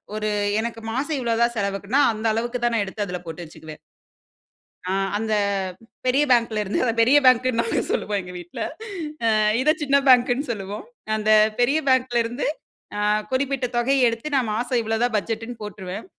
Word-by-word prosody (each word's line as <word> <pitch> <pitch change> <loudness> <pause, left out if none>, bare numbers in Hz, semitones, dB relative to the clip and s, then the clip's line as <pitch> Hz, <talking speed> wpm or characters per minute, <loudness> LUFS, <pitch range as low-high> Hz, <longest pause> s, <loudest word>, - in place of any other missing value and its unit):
1 215 0 -2 0.3
எனக்கு 230 0 -4
மாசம் 285 +3 -1
இவ்ளோ 235 -2 0
தான் 235 0 0
செலவுக்குன்னா 200 +6 0
அந்த 215 +1 -6
அளவுக்கு 240 +2 -2
தான் 240 - +1
நான் 205 -3 +1
எடுத்து 205 +2 -4
அதுல 180 0 -5
போட்டு 165 +2 -6
வச்சுக்குவேன். 155 -1 -11 1.1
ஆ - - +1 0.2
அந்த 220 0 -2 0.7
பெரிய 265 +3 +3
பேங்க்லருந்து 220 -4 +1
அத 245 - +2
பெரிய 260 +6 +5
பேங்க்ன்னு 255 -1 +4
நாங்க 230 - -1
சொல்லுவோம் 205 -1 -1
எங்க 180 0 -10
வீட்ல. 175 0 -8 0.6
அ - - +3 0.3
இத 305 +3 +4
சின்ன 280 -1 +3
பேங்க்ன்னு 250 +2 +4
சொல்லுவோம். 200 -1 -6 0.3
அந்த 215 0 -1 0.3
பெரிய 270 +5 +3
பேங்க்லருந்து 245 -1 +1 0.5
அ - - -2 0.3
குறிப்பிட்ட 265 -1 0
தொகை 255 +3 +2
எடுத்து 230 +6 -3
நான் 240 -5 +1
மாசம் 245 +1 0
இவ்ளோ 225 0 -1
தான் 245 -3 +1
பட்ஜெட்ன்னு 225 +3 -4
போட்ருவேன். 195 0 -7
230 Hz, 160 wpm, -23 LUFS, 210-255 Hz, 1.1 s, பெரிய